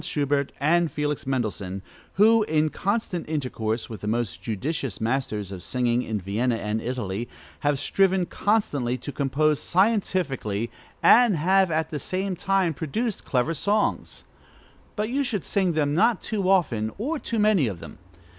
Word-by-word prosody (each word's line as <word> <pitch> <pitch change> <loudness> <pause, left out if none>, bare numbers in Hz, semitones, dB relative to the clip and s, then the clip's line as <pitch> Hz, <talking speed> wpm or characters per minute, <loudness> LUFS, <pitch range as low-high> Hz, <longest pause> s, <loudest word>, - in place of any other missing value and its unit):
Schubert 140 -1 0
and 165 +4 +3 0.4
Mendelssohn, 100 -7 -2 0.3
who, 220 +3 +5
in 155 -2 +1
constant 195 -3 -2
intercourse 120 -7 -2
with 110 - -8
the 105 - -5
most 110 -6 -1
judicious 130 +4 -3
masters 110 -4 -2
of 95 -2 -7
singing 120 +3 0
in 110 -3 -3
Vienna 110 +6 0
and 110 0 -2
Italy, 120 -2 -3 0.3
have 145 -1 +1
striven 190 +4 +2
constantly 145 - 0
to 130 +4 -7
compose 145 +2 +1
scientifically, 170 - 0 0.3
and 235 -6 +6
have 190 +4 +3
at 160 0 -1
the 150 - -3
same 185 +5 -2
time 190 -2 +1
produced 205 - -3
clever 130 +5 +1
songs; 205 +7 -1 0.7
but 215 +2 -2
you 280 +2 +1
should 210 -8 -2
sing 190 -4 +1
them 145 -2 +1
not 225 +8 +3
too 200 -4 -2
often, 125 - +2
or 290 +9 -2
too 230 - -3
many 210 - +3
of 95 -6 -5
them. 80 -3 -11
150 Hz, 150 wpm, -25 LUFS, 120-195 Hz, 0.7 s, and